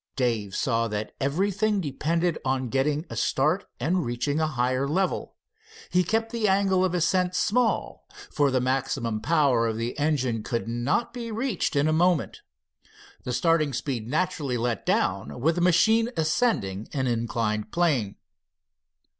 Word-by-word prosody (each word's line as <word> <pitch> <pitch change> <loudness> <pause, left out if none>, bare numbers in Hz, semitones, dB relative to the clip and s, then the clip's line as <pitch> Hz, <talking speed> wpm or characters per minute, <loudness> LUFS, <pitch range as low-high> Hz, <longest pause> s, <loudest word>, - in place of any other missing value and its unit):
Dave 115 -7 -1
saw 115 -4 +1
that 105 0 -4
everything 200 +8 +1
depended 165 +2 -1
on 130 -2 -1
getting 145 +5 0
a - - -5
start 155 +9 +1
and 170 +8 +1
reaching 130 +5 -1
a 160 - +2
higher 130 -1 0
level. 185 +6 -1 0.6
He 180 0 +3
kept 225 +5 -1
the 230 -3 0
angle 190 -1 +3
of 180 -1 0
ascent 180 +1 +1
small, 235 +4 0 0.2
for 145 -2 +2
the 130 -1 +1
maximum 125 -3 -1
power 140 -8 +2
of 110 -1 -2
the 115 +1 -3
engine 130 -7 0
could 115 +1 -3
not 120 - -1
be 235 -2 -5
reached 225 - -2
in 140 +2 +3
a 155 - +2
moment. 175 -1 +1 0.8
The 125 - -2
starting 155 +1 +2
speed 120 -3 -3
naturally 150 -5 -1
let 120 0 -2
down 75 - 0
with 160 +7 +2
the 175 - -2
machine 220 +7 +4
ascending 155 - 0
an 130 -2 -1
inclined 115 -3 -1
plane. 140 - +1
145 Hz, 150 wpm, -26 LUFS, 120-180 Hz, 0.8 s, machine